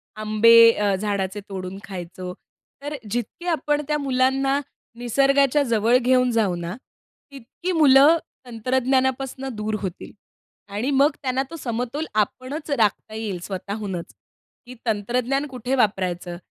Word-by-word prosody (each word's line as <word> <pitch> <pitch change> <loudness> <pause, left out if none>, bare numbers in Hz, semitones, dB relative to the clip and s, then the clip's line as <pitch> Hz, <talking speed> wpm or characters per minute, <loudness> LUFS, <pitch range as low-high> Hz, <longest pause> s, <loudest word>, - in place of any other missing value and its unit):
आंबे 230 +2 +6
अ, 205 -3 0
झाडाचे 200 0 -2
तोडून 185 0 -6
खायचो. 180 -1 -7 0.5
तर 295 +1 -4 0.2
जितकी 240 +9 -4
आपण 300 -3 0
त्या 300 0 +1
मुलांना 270 0 +1 0.4
निसर्गाच्या 275 +3 +3
जवळ 235 -1 +3
घेऊन 250 0 +3
जाऊ 210 -6 +1
ना, 170 +2 -5 0.6
तितकी 280 +7 -6
मुलं 295 0 +6 0.3
तंत्रज्ञानापासनं 260 +2 -1
दूर 215 0 -2
होतील 185 -4 -6 0.6
आणि 225 +7 -1
मग 280 +3 +4
त्यांना 260 0 0
तो 330 - -6
समतोल 250 +4 -3
आपणच 255 +9 -2
राखता 215 -3 0
येईल 210 -5 -4
स्वतःहूनच, 195 -2 -5 0.5
की 250 +1 -11
तंत्रज्ञान 245 +6 0
कुठे 255 0 -3
वापरायचं 180 -6 -1
240 Hz, 120 wpm, -23 LUFS, 205-270 Hz, 0.6 s, आंबे